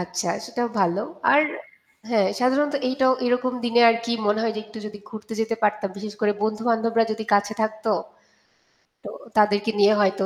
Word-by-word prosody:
আচ্ছা 180 0 -3 0.2
সেটাও 240 0 -2
ভালো। 185 +1 +1 0.3
আর 290 +2 +6 0.7
হ্যাঁ 210 -5 +3
সাধারণত 280 +4 +2
এইটাও 260 0 +2
এরকম 250 +1 +1
দিনে 240 0 +3
আর 230 - +1
কি 235 - -2
মনে 210 +1 +2
হয় 225 -1 0
যে - - -2
একটু 220 +1 -11
যদি 210 0 -9
ঘুরতে 220 0 -9
যেতে 225 +1 0
পারতাম। 210 -1 +1
বিশেষ 210 +1 -7
করে 210 -1 +2
বন্ধু 215 0 -1
বান্ধবরা 230 0 +2
যদি 220 0 -5
কাছে 205 +1 +2
থাকত। 220 +1 -3 1.2
তো - - -7 0.3
তাদেরকে 210 +1 +3
নিয়ে 205 +1 +6
হয়তো 195 0 +1
220 Hz, 175 wpm, -23 LUFS, 205-235 Hz, 1.2 s, আর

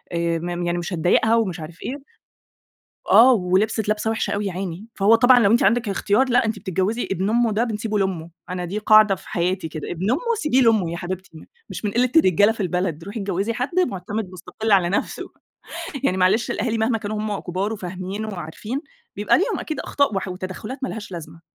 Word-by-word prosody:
مم 175 +1 -1
مش 175 +2 -5
هتضايقها 180 +7 +3
ومش 205 -8 0
عارف 160 +2 -10
إيه، - - -4 1.2
آه، 250 +3 +8
ولبِست 205 +1 +1
لابسة 215 +1 0
وِحشة 225 - -1
أوي 205 0 -1
ياعيني. 185 +1 -5
فهو 205 +3 +4
طبعًا 245 +2 +6
لو 200 -3 +4
أنتِ 235 - +4
عندِك 230 +4 +3
الاختيار 205 +5 +1
لأ، 245 -1 +3
أنتِ 220 -1 -2
بتتجوِّزي 195 +4 -2
ابن 195 +2 0
أمُّه 235 -1 +2
ده 220 +3 +1
بنسيبه 215 -2 -2
لأمُّه، 180 -4 -2 0.2
أنا 180 0 -4
دي 195 +5 -3
قاعدة 215 -1 +6
في 185 - -14
حياتي 180 0 -1
كده، 155 -2 -6
ابن 185 +5 -2
أمُّه 265 - +1 0.2
سيبيه 295 -6 +2
لأمُّه 220 -8 +3
يا 170 - -4
حبيبتي 185 +2 -6
م - - -13 0.3
مش - - -7
من 205 - 0
قِلِّة 245 +4 +1
الرجالة 205 - +5
في 225 - -11
البلد، 180 -3 -2
روحي 205 +4 -6
اتجوِّزي 195 +2 -1
حد 260 +10 -2
مُعتمد 200 +2 -4
ومُستقل 190 +4 -4
على 185 -3 +4
نَفْسه. 195 - -2 0.8
يعني 185 - +2
معلش 190 +5 +2
الأهالي 225 +1 -1
مهما 225 +1 +1
كانوا 210 0 -4
هم 210 -1 -2
كُبار 190 +4 -3
وفاهمين 190 +1 -5
وعارفين، 210 - -5 0.4
بيبقى 205 +8 +3
ليهم 405 0 0
أكيد 310 - -4
أخطاء 280 -6 0
وح 190 - -2
وتدخُّلات 185 +7 -6
مالهاش 225 -6 -5
لازمة، 165 -1 -8
200 Hz, 190 wpm, -22 LUFS, 180-225 Hz, 1.2 s, آه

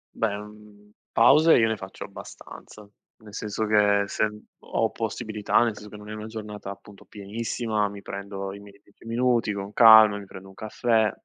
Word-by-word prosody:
Beh, 100 -2 -1
mhmm, 105 0 -14 0.2
pause 155 +8 +6
io 115 -1 +3
ne 110 - -1
faccio 95 -2 -9
abbastanza, 105 -1 -12 0.3
nel 105 -2 -15
senso 105 +1 -3
che 105 -1 +3
se 105 - 0
n 105 0 -8 0.2
ho - - -1
possibilità 105 -1 -2
nel 115 -2 0
senso 105 0 -12
che 105 - -11
non 105 0 -12
è - - -6
una 110 0 -7
giornata 105 -2 -8
appunto 100 0 -12
pienissima, 110 +1 -3
mi 100 0 -11
prendo 100 0 -6
i 100 - -10
miei 100 0 -16
10 105 - -22
minuti 115 -2 +1
con 100 +1 -6
calma, 110 -3 +8
mi 100 - -10
prendo 95 0 -12
un 95 - -15
caffè, 110 +1 0
105 Hz, 185 wpm, -25 LUFS, 100-110 Hz, 0.3 s, calma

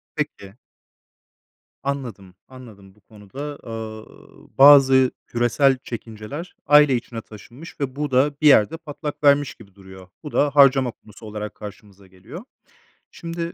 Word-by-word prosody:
Peki. 145 -10 -5 1.3
Anladım, 120 -9 -6
anladım. 110 -7 -15
Bu 105 - -28
konuda, 110 +9 -10
eee, 110 -1 -10
bazı 135 -2 +7 0.2
küresel 125 +3 +1
çekinceler 115 +8 -8
aile 150 -2 +5
içine 115 -1 -7
taşınmış 120 +10 -14
ve 135 -2 -4
bu 150 0 -3
da 135 +3 +2
bir 155 - +1
yerde 145 +3 +4
patlak 150 -2 -8
vermiş 140 -1 +3
gibi 100 -5 -18
duruyor. 95 -1 -15
Bu 150 - -9
da 145 - +2
harcama 135 -2 +5
konusu 110 -1 -16
olarak 105 0 -7
karşımıza 100 -2 -13
geliyor. 95 - -12 0.7
Şimdi 170 0 -6
130 Hz, 130 wpm, -21 LUFS, 105-145 Hz, 1.3 s, bazı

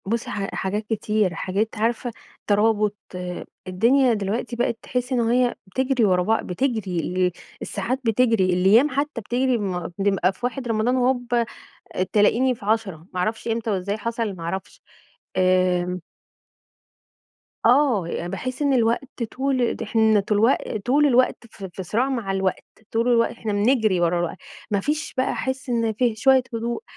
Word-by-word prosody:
بُصي 230 +3 -2
ح 195 -1 -4
حاجات 205 +3 -2
كتير. 210 -3 0
حاجات 195 +6 -1
عارفة، 235 +2 0 0.4
ترابط 210 0 +2 0.7
الدنيا 240 +7 +3
دلوقتي 220 +4 -2
بقيت 235 -1 0
تحسّي 250 +1 -2
إن - - +1
هي 240 +1 +2
بتجري 255 +4 +1
ورا 180 -2 +3
بع 225 +4 +1
بتجري، 195 -3 -2
ال 180 +2 0 0.3
الساعات 255 +2 -2
بتجري، 225 -3 +3
الأيّام 200 +10 +5
حتّى 280 -2 -2
بتجري؛ 250 +3 +1
ما 180 -4 -3
نبقى 195 -2 +2
في - - -23
1 250 0 -3
رمضان 225 +2 +1
وهوبَّا 245 -2 +1 0.7
تلاقيني 240 +5 +3
في 225 - -13
10، 200 -7 -1
ما 180 - -1
أعرفش 220 +5 -2
إمتى 230 0 -1
وإزاي 200 +1 -1
حصل 230 -2 -2
ما 170 - -9
أعرفش. 190 +3 -5 0.6
آمم. 180 -1 +2 1.7
آه، 245 - +4
يع 170 - -4
باحس 255 +9 -5
إن 285 -2 +2
الوقت 240 +1 0
طول 260 -2 0
ده - - -5
إحنا 220 -2 +3
تلوق 210 +4 +1
طول 255 +8 +2
الوقت 255 -2 +3 0.4
في 190 - -6
صراع 235 +9 0
مع 235 -7 -2
الوقت، 190 -1 -1 0.3
طول 230 +2 +1
الوقت 235 -2 +3
إحنا 225 -3 -4
بنجري 215 -2 +2
ورا 175 0 +2
الوق 175 -1 -1 0.4
ما 200 - +2
فيش 300 +9 -2
بقى 260 - +1
أحس 260 0 -3
إن 230 -2 +1
في 235 0 +1
شويّة 260 +3 +4
هدوء. 235 - -3
225 Hz, 155 wpm, -23 LUFS, 195-250 Hz, 1.7 s, الأيّام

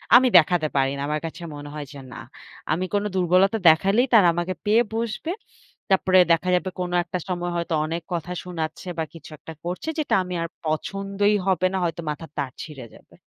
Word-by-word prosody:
আমি 255 +1 +7
দেখাতে 165 -1 +3
পারি 135 -1 +2
না, - - -4
আমার 150 0 -1
কাছে 170 +2 -7
মনে 145 0 -8
হয় 150 -1 -5
যে 140 - -9
না। - - -9 0.5
আমি 175 +4 0
কোনো 205 0 +1
দুর্বলতা 185 +4 +3
দেখালেই 195 +10 +3
তারা 205 -6 +7
আমাকে 175 +2 -1
পেয়ে 220 +3 +4
বসবে। 230 +8 -2 0.6
তারপরে 185 -1 +4
দেখা 165 +2 +2
যাবে 180 +1 -1
কোনো 180 -1 -3
একটা 175 +1 -4
সময় 175 -1 -2
হয়তো 170 -1 -2
অনেক 165 +2 -3
কথা 175 +1 -3
শুনাচ্ছে 165 -1 -5
বা - - +1
কিছু 165 -3 -12
একটা 160 - -10
করছে 180 - -4
যেটা 300 - +1
আমি 180 0 -6
আর - - -2 0.2
পছন্দই 195 +6 0
হবে 185 -1 +2
না 190 - 0
হয়তো 170 -1 -2
মাথার 150 +1 -6
তার 140 -3 -2
ছিঁড়ে 140 -6 -9
যাবে। - - -20
175 Hz, 195 wpm, -24 LUFS, 160-195 Hz, 0.6 s, আমি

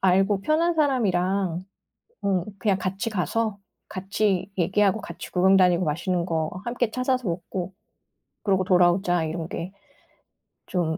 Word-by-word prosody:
'알고 195 +2 +3
편한 330 +4 +2
사람이랑 195 - +1 0.6
응 190 -3 +1
그냥 195 0 +1
같이 195 +5 -2
가서 215 +2 -1 0.3
같이 195 0 -1
얘기하고 195 +4 +2
같이 - - -8
구경 190 +2 +4
다니고 180 -1 +4
맛있는 175 +3 -1
거 160 -2 -1
함께 245 -1 -1
찾아서 255 -3 0
먹고 175 +2 -4 0.7
그러고 190 -2 +2
돌아오자.' 175 -2 +3
이런 160 +1 -4
게 175 +3 -5 1.0
좀 165 -3 -1
190 Hz, 275 characters per minute, -25 LUFS, 175-210 Hz, 1.0 s, 구경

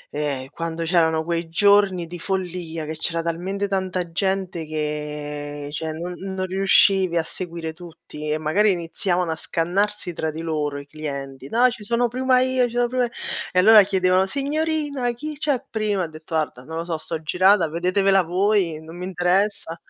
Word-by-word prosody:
Ehm, 140 -3 -2
quando 165 0 -4
c'erano 160 -2 +2
quei 170 0 -2
giorni 200 -1 +4
di 175 +1 -8
follia 175 -3 -3
che 155 - -4
c'era 165 +1 -1
talmente 185 +4 -2
tanta 185 -3 -2
gente 185 -2 -1
che 150 -1 -4
cioè 160 +1 -3
non 170 +3 -5 0.2
non 185 0 -1
riuscivi 190 -1 +4
a 165 - +2
seguire 170 -2 -6
tutti 160 -2 -9
e 150 - +1
magari 155 +8 +2
iniziavano 175 0 0
a - - -1
scannarsi 180 +4 -1
tra 160 -1 -2
di 155 +1 -5
loro 150 -3 -2
i 140 - -8
clienti 140 -2 -6
"No 240 +3 +4
ci 225 -3 -8
sono 235 +3 +1
prima 255 +1 +3
io, 255 -1 +2
ci 235 - -10
sono 245 0 +3
prima 250 0 +1
i" - - -5 0.4
e - - -2
allora 210 +4 +9
chiedevano: 190 -1 +2
"Signorina, 285 0 -1
chi 300 +6 -6
c'è 285 -4 0
prima," 210 -3 -1
ho - - -2
detto: 160 +1 -8
"Guarda, 155 -5 -1
non 160 +4 -7
lo 165 - -3
so, 165 -2 -3
sto 160 +1 -4
girata, 185 +2 +4
vedetevela 185 +4 +2
voi, 180 -2 +1
non 160 +1 -11
mi 180 - -5
interessa." 185 -1 0
175 Hz, 180 wpm, -23 LUFS, 160-200 Hz, 0.4 s, allora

